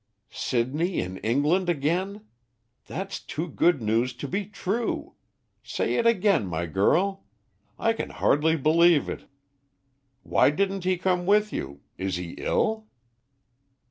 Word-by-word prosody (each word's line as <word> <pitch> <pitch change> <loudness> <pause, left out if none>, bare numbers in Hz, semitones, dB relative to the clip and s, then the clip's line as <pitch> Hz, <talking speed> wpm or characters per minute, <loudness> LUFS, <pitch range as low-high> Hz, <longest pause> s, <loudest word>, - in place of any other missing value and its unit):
"Sidney 145 +9 -1
in 95 +1 -4
England 150 - +1
again? 180 +7 -1 0.6
That's 195 +2 -5
too 160 +3 -5
good 160 -3 +2
news 115 +4 +1
to 140 - -6
be 195 +5 -2
true. 210 +3 -3 0.5
Say - - -2
it 230 - +2
again, 200 - +3
my 85 0 -2
girl, 175 - +1 0.5
I 225 - +2
can - - -4
hardly 160 +3 +2
believe 160 +1 +4
it. - - -6 1.0
Why - - +4
didn't 195 +4 -1
he 185 0 +2
come 180 0 0
with 210 +1 +3
you? 70 +1 -5 0.2
Is 95 -1 -1
he 90 -1 -5
ill?" 220 0 0
170 Hz, 130 wpm, -26 LUFS, 130-195 Hz, 1.0 s, believe